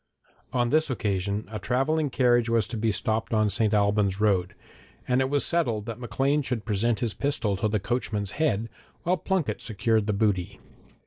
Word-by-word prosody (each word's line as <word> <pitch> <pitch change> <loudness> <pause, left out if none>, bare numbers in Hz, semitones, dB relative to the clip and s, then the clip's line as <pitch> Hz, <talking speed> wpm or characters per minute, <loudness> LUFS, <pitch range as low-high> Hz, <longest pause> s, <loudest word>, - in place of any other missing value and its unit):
On 120 -1 +1
this 155 0 +2
occasion 100 -3 -2
a 105 - -4
travelling 135 - 0
carriage 120 -3 +3
was 115 -2 +2
to 115 - -4
be 110 0 +1
stopped 110 +2 -1
on 110 0 +3
the - - +1
St. 105 +1 +1
Albans 100 -2 +2
road, 95 -4 +1 0.5
and 125 +1 +2
it 130 - 0
was 145 0 +2
settled 120 -12 0
that 115 0 -6
Maclean 135 +4 0
should 125 -5 -3
present 115 +3 0
his 115 -4 -1
pistol 130 -8 -1
to 110 - 0
the 105 0 0
coachman's 105 -3 -2
head, 115 -8 0 0.4
while 180 +2 +2
Plunket 160 - -1
secured 110 0 0
the 105 - +1
booty. 100 -2 0
110 Hz, 185 wpm, -26 LUFS, 105-125 Hz, 0.5 s, carriage